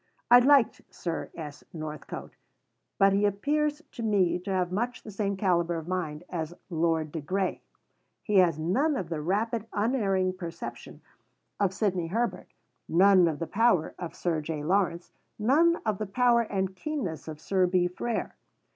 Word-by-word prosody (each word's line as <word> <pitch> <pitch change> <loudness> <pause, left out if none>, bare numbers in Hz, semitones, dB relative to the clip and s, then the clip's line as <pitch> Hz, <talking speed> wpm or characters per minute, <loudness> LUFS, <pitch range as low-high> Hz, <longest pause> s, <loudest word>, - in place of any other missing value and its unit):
I 245 - +10
liked 270 -1 +4
Sir 170 -2 -4
S. 150 -3 -8
Northcote; 155 -2 -7 0.6
but 195 -1 +5
he 200 +1 +2
appears 295 +9 0
to - - -8
me 200 -6 +2
to 180 - -8
have 180 -2 0
much 240 +6 -2
the 215 - -8
same 200 -1 -2
calibre 175 -3 +1
of 160 0 -7
mind 175 -4 -3
as 165 -1 -4 0.2
Lord 160 -2 0
de 160 - -4
Grey. 185 +5 -1 0.6
He 210 -2 +1
has 175 -4 +5
none 255 - +1
of 185 -10 -3
the 160 -3 -3
rapid, 215 +6 -1
unerring 200 -5 +1
perception 170 -3 -8 0.6
of 200 -3 +2
Sidney 190 -4 -1
Herbert; 230 +7 -2 0.4
none 185 +1 +6
of 155 -3 -1
the 165 - -3
power 200 -5 +2
of 175 -2 -6
Sir 165 -3 -1
J. 150 -1 -4
Lawrence; 175 0 0 0.3
none 300 +10 +4
of 215 -3 0
the 215 - -3
power 240 +3 +3
and 190 -4 -2
keenness 215 - -4
of 155 -1 -7
Sir 185 +2 +1
B. 180 0 +2
Frere. 225 +6 -3
185 Hz, 165 wpm, -28 LUFS, 170-220 Hz, 0.6 s, I